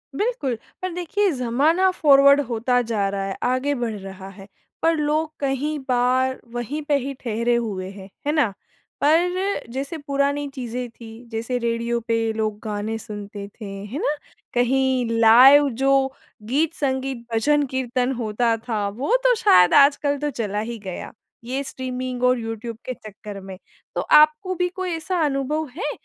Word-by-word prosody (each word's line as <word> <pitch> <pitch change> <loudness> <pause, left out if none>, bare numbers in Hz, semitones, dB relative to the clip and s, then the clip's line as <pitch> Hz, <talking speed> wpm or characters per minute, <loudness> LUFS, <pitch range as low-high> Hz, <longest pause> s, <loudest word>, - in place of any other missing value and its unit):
बिल्कुल, 350 - -1 0.2
पर 370 - -2
देखिए 390 +3 0
ज़माना 290 +9 +2
फॉरवर्ड 280 -3 +6
होता 245 +2 +1
जा 220 -4 -1
रहा 195 0 -3
है, 195 - -4
आगे 255 +3 +1
बढ़ 235 -3 -2
रहा 190 0 -9
है, 195 +1 -13 0.3
पर 330 0 +3
लोग 305 +1 0
कहीं 285 +2 -1
बार 255 +1 +2
वहीं 245 +6 -3
पे 290 - +3
ही 275 +1 -4
ठहरे 235 +1 0
हुए 200 -5 -3
हैं, 195 -1 -11 0.2
है - - +3
ना? 265 -11 +2 0.5
पर 355 +4 +2
जैसे 275 +5 -4
पुरानी 285 0 -1
चीज़ें 250 -2 -5
थी, 230 +1 -12
जैसे 230 +3 -2
रेडियो 235 0 -1
पे 225 -1 +1
लोग 215 -1 -2
गाने 215 +1 -3
सुनते 205 -1 -7
थे, 210 +1 -11 0.2
है 255 +9 -5
ना? 300 - 0 0.4
कहीं 255 0 +2
लाइव 265 +6 +8
जो 270 +2 +2 0.3
गीत-संगीत, 265 -3 -1
भजन-कीर्तन 260 0 +1
होता 230 +1 +1
था 210 -3 -1
वो 270 - 0
तो - - +5
शायद 180 - +5
आजकल 285 0 +4
तो 295 +1 -2
चला 210 -5 -3
ही 230 +2 -4
गया, 185 -3 -7 0.3
ये 265 +4 -3
स्ट्रीमिंग 255 -1 -5
और 250 -1 +4
यूट्यूब 225 0 -5
के 255 - -3
चक्कर 210 -2 -10
में। 190 -1 -9 0.4
तो - - 0
आपको 305 +5 +4
भी 360 +1 +1
कोई 370 0 -4
ऐसा 335 +2 -2
अनुभव 290 +2 -1
है, 420 - -2
255 Hz, 155 wpm, -23 LUFS, 225-290 Hz, 0.5 s, लाइव